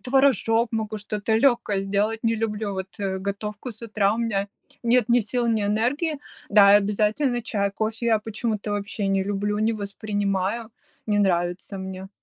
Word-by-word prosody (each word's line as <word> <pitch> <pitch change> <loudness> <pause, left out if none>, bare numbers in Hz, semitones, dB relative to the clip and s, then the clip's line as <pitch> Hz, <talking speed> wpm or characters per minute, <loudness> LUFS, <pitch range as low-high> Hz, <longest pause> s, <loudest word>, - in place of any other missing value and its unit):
творожок, 245 -2 +3
могу 220 -1 -2
что-то 210 +1 -2
легкое 235 -5 +2
сделать, 205 +3 0
не 230 0 +1
люблю 210 -2 -2
вот, 190 +1 -6
э, 190 -1 -1
готовку 210 +4 -5
с 220 - -14
утра, 210 -2 +1
у - - -5
меня 205 -4 -1 0.4
нет 240 -1 +3
ни 240 0 +5
сил, 240 +3 -1
ни 220 -3 +1
энергии. 255 +10 0 0.3
Да, 200 -1 +7
и - - +9
обязательно 215 +5 0
чай, 200 -3 -1
кофе 220 +3 -3
я 225 -2 +4
почему-то 215 -1 -3
вообще 205 0 -2
не 195 -1 +1
люблю, 205 +1 -1
не 220 +1 +2
воспринимаю, 205 +1 -2 0.4
не 210 -1 +1
нравится 180 0 0
мне. 190 0 -6
210 Hz, 165 wpm, -24 LUFS, 200-230 Hz, 0.4 s, и